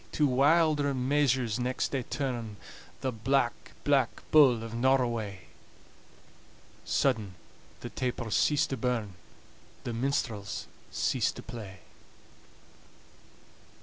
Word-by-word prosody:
To 150 - +3
wilder 145 +1 +3
measures 130 -3 +1
next 125 +1 -1
they 135 - 0
turn 120 -5 -3 0.5
"The 130 - -1
Black, 120 +2 +1 0.3
Black 135 -4 +1
Bull 130 -7 +6
of 115 0 -7
Norroway!" 115 -6 +1 1.4
Sudden 110 -9 0 0.5
the - - -6
tapers 120 -4 -2
cease 150 +1 +3
to 135 - -4
burn, 115 -5 -1 0.7
The 120 - -3
minstrels 115 -5 -2 0.2
cease - - +1
to - - -10
play. 100 -6 -9
125 Hz, 100 wpm, -29 LUFS, 115-140 Hz, 1.4 s, Bull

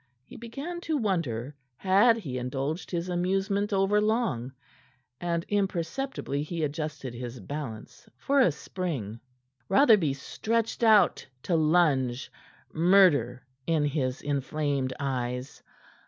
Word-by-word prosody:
He - - -13
began 275 +10 -6
to 320 -3 -1
wonder 150 - -2 0.2
had 205 +5 +4
he 135 - -4
indulged 135 +6 -3
his 170 0 -2
amusement 195 +3 0
overlong, 205 - +1 0.7
and 170 -1 -2
imperceptibly 195 - -2
he 160 +2 -3
adjusted 150 -3 -4
his 120 +1 -7
balance 140 -7 -7
for 280 - +1
a 215 - +5
spring. 140 - -5 0.5
Rotherby 195 - +5
stretched 225 - -2
out 215 -5 +4 0.2
to 175 - 0
lunge, 150 -6 +2 0.4
murder 160 - +4 0.2
in 160 -3 +2
his 135 -3 -2
inflamed 140 -1 -1
eyes. 125 -1 -3
160 Hz, 110 wpm, -28 LUFS, 135-200 Hz, 0.7 s, a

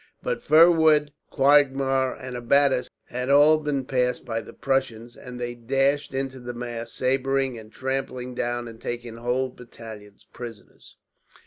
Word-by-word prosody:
But - - -2
fir 165 +3 +7
wood, 155 -3 +3 0.2
quagmire, 135 -2 +3
and 130 -1 -8
abattis 125 +1 +2 0.2
had 125 +2 -4
all 150 +2 +6
been 145 -3 -2
passed 125 -1 0
by 115 -1 -2
the - - -12
Prussians, 120 -4 -2
and 125 -1 -10
they 120 0 -3
dashed 135 +4 0
into 135 -1 -3
the 120 0 -7
mass, 120 -1 -5
sabring 135 -1 0
and 110 0 -14
trampling 130 -1 -4
down, 120 0 -2
and 115 -1 -11
taking 120 -1 -5
whole 125 +2 -1
battalions 110 -4 -12
prisoners. 115 -3 -11
130 Hz, 145 wpm, -25 LUFS, 120-135 Hz, 0.2 s, fir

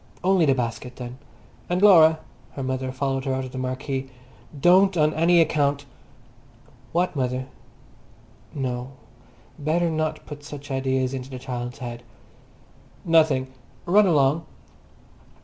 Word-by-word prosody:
"Only 185 -3 +3
the 135 - +4
basket, 125 0 -4
then. 125 +1 -8 0.5
And, 180 +1 +1
Laura!"—her 160 -9 +3
mother 130 0 -2
followed 135 0 -2
her 135 -1 0
out 130 0 -3
of 130 - -9
the 130 - -6
marquee—"don't 135 +8 0
on 155 0 +3
any 170 +2 +4
account—" 145 -3 +1 1.1
"What 175 0 0
mother?" 130 -1 -1 1.1
No, 130 -2 -4 0.7
better 165 +3 0
not 155 0 -2
put 145 -1 -9
such 145 -1 -9
ideas 130 -1 0
into 130 0 -5
the 130 - -7
child's 125 -1 -5
head! 120 -3 -7 1.0
"Nothing! 150 -6 +3 0.3
Run 200 +3 +5
along." 150 0 +2
135 Hz, 120 wpm, -24 LUFS, 130-160 Hz, 1.1 s, Run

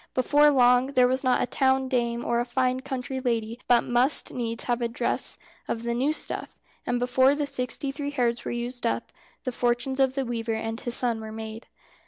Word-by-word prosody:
Before 290 +3 +4
long 250 -2 +4
there 250 -2 +5
was 260 +2 -1
not 255 -1 +2
a - - +1
town 265 +1 +1
dame 235 -2 -1
or 235 0 +1
a - - +1
fine 255 +1 0
country 265 0 -4
lady 230 -2 -2
but 240 -1 +5
must 245 +4 +2
needs 230 -2 -1
have 240 0 -1
a 235 - +1
dress 230 - -1 0.3
of 230 - -3
the 235 0 -1
new 260 +5 +1
stuff, 310 - -5 0.3
and 245 - +1
before 260 +3 +3
the 295 0 -1
sixty 270 0 -3
three 285 +1 -4
hairs 245 -4 0
were - - -4
used 240 0 -3
up, - - -2 0.3
the 255 - -2
fortunes 245 +2 -1
of 265 -1 +3
the 270 -1 -1
weaver 230 -1 -2
and 225 +1 -4
his 240 -1 -1
son 235 -3 +1
were 220 0 -7
made. 220 +1 -8
245 Hz, 210 wpm, -26 LUFS, 235-265 Hz, 0.3 s, there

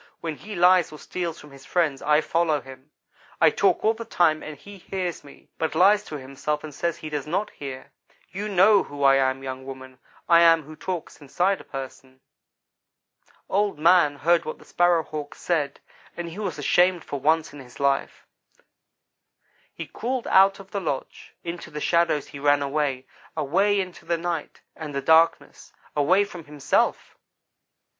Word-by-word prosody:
When 160 -2 -4
he 210 +6 -9
lies 180 -1 +4
or 155 - -9
steals 170 +1 -5
from 150 - -14
his 135 -1 -14
friends 155 -6 0
I 150 +1 +3
follow 165 -2 +1
him. 135 +1 -14 0.5
I - - +6
talk - - +1
all 220 - +4
the 230 +1 -7
time 170 -8 +2
and 155 -1 -8
he 200 +6 -13
hears 180 -1 -4
me, 140 - -17
but 160 - -1
lies 205 +3 +5
to 150 - -6
himself, 140 +3 -4
and 155 -1 -8
says 170 +3 -2
he 155 - -7
does 150 -1 -3
not 190 +7 -2
hear. 135 -1 -8 0.4
You 205 +3 -4
know 200 +1 +5
who 145 -1 -6
I 135 0 +6
am, 135 0 0
young 130 0 -6
woman, 130 -1 -10 0.3
I 170 -1 +6
am 165 -3 +5
what 155 0 -12
talks 180 -4 -5
inside 180 +7 0
a - - -13
person.' 130 -1 -9 1.3
"Old 205 -3 0
man 165 -2 +4
heard 170 +3 +2
what 155 - -6
the - - -18
Sparrow 175 -2 +2
hawk 150 -2 -7
said, 150 -5 -2 0.4
and 170 -1 -4
he 165 - -9
was 190 -7 -3
ashamed 175 +4 +2
for 140 - -5
once 155 +2 +1
in 145 - -10
his 125 -2 -13
life. 140 -1 -1 1.5
He - - -7
crawled 250 0 -4
out 195 +1 +5
of 195 0 -13
the 200 - -3
lodge. 135 -7 -5
Into 170 0 -6
the 150 - -6
shadows 170 -2 +1
he 140 - -9
ran 145 0 +3
away 140 -2 -1 0.3
away 195 +8 +2
into 185 -2 -6
the 170 - 0
night, 170 -2 -4
and 150 -3 -7
the 140 - -1
darkness 160 +3 +2 0.2
away 180 +8 +4
from 175 -5 -10
himself! 145 -2 -1
160 Hz, 180 wpm, -24 LUFS, 140-180 Hz, 1.5 s, I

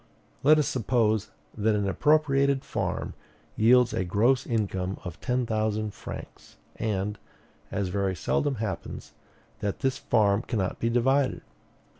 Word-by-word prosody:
Let 155 +3 +6
us 150 - +2
suppose 110 -3 +1 0.3
that 110 0 +1
an 100 -1 0
appropriated 140 - +2
farm - - -3 0.4
yields 125 +2 +5
a - - 0
gross 115 +8 +2
income 95 -5 -1
of 90 -3 -7
ten 125 -1 0
thousand 110 -1 -1
francs; - - -10 0.2
and, 105 -1 -2 0.5
as 100 -2 -1
very 95 0 -1
seldom 140 - 0
happens, 105 -5 -5 0.5
that 100 -1 -3
this 135 -2 0
farm 105 -2 +2
cannot 105 -6 -2
be 115 - +1
divided. 130 +3 +2
110 Hz, 130 wpm, -27 LUFS, 100-130 Hz, 0.5 s, Let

